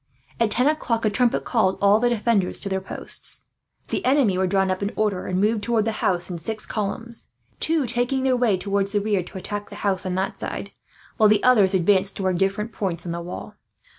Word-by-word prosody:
At 230 -1 +3
ten 250 +4 +3
o'clock 245 -7 0
a 215 - +2
trumpet 245 +2 +1
called 205 -6 +1
all 200 +2 +4
the 245 +1 +2
defenders 220 -5 +1
to 200 - -4
their 190 0 -1
posts. 190 - -5 0.4
The - - -2
enemy 260 -7 +3
were 185 0 +1
drawn 190 0 +1
up 185 - -2
in 200 +1 -1
order, 205 -4 -1
and 185 0 -1
moved 215 +2 +1
towards 225 0 +1
the 225 - 0
house 175 -1 +1
in 175 -2 -5
six 215 +6 -1
columns; 230 +3 -4 0.3
two 320 -3 +3
taking 245 +2 0
their 260 -1 +3
way 240 -6 +2
towards 200 +1 -1
the 205 - +3
rear, 205 -2 0
to 180 - -9
attack 205 +2 -5
the - - -10
house 190 -2 +1
on 185 -1 -3
that 190 +1 -2
side, - - -5 0.5
while 215 -2 +5
the 210 -1 +3
others 210 -6 +5
advanced 190 +2 +2
toward 185 -3 -1
different 195 +3 0
points 185 -6 -3
on 170 - -3
the 170 0 -4
wall. 175 +1 -7
205 Hz, 220 wpm, -23 LUFS, 190-230 Hz, 0.5 s, while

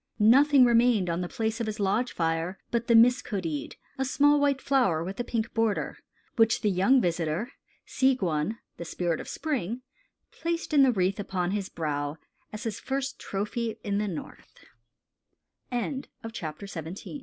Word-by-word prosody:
Nothing 260 +5 +6
remained 235 -6 +3
on 170 +2 -1
the 175 - -4
place 225 +1 -2
of 230 - -2
his 215 0 -4
lodge 205 +5 +1
fire 165 +2 -1
but 235 0 -1
the 235 - +5
mis 245 +2 +6
kodeed, 165 -9 -4 0.2
a - - +2
small 290 +2 +4
white 285 -1 +2
flower 245 - +2
with 190 +5 -6
a - - 0
pink 230 -1 -3
border, 225 -3 0 0.4
which 225 -1 +4
the 210 - +2
young 195 +9 +4
visitor, 175 - -1 0.3
Seegwun, 215 - +1 0.2
the - - -5
Spirit 170 -1 -1
of - - -7
Spring, 255 - -3 0.5
placed 335 -1 -3
in 290 - +6
the 265 -2 +6
wreath 190 -2 0
upon 185 -3 -2
his 200 -1 -2
brow, 145 -2 -3 0.3
as 215 +1 -7
his 220 -3 -3
first 270 0 -3
trophy 215 +3 -3
in 200 -1 -1
220 Hz, 145 wpm, -27 LUFS, 180-250 Hz, 0.5 s, Nothing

